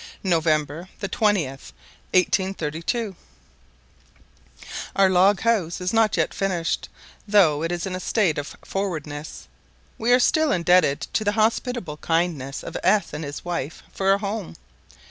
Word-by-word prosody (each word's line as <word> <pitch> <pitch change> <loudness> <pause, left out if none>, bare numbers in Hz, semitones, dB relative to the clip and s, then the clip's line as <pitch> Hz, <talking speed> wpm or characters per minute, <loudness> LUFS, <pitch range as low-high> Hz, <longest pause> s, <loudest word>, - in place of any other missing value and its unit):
November 160 -1 0
the 195 - -2
20th, 165 - 0 0.4
1832. 185 +3 0 1.8
OUR 195 -1 +5
log 190 +2 +4
house 210 -8 +1
is 180 +2 -2
not 225 -2 +3
yet - - +1
finished, 180 -4 -1 0.4
though 180 -8 +4
it 165 +1 -1
is 175 +1 -2
in 185 -1 -3
a - - -4
state 185 -6 +1
of 145 - -7
forwardness. 155 - -4 0.5
We 235 +2 +1
are 250 - +6
still 315 +4 +3
indebted 175 - +3
to 215 - +1
the 205 0 +1
hospitable 220 -5 0
kindness 165 -5 -1
of - - -8
S 210 -4 +2
and 150 - -4
his 145 +2 -7
wife 165 -4 -4
for 195 0 +2
a 195 - +4
home. 200 -1 -4
180 Hz, 140 wpm, -23 LUFS, 160-205 Hz, 1.8 s, are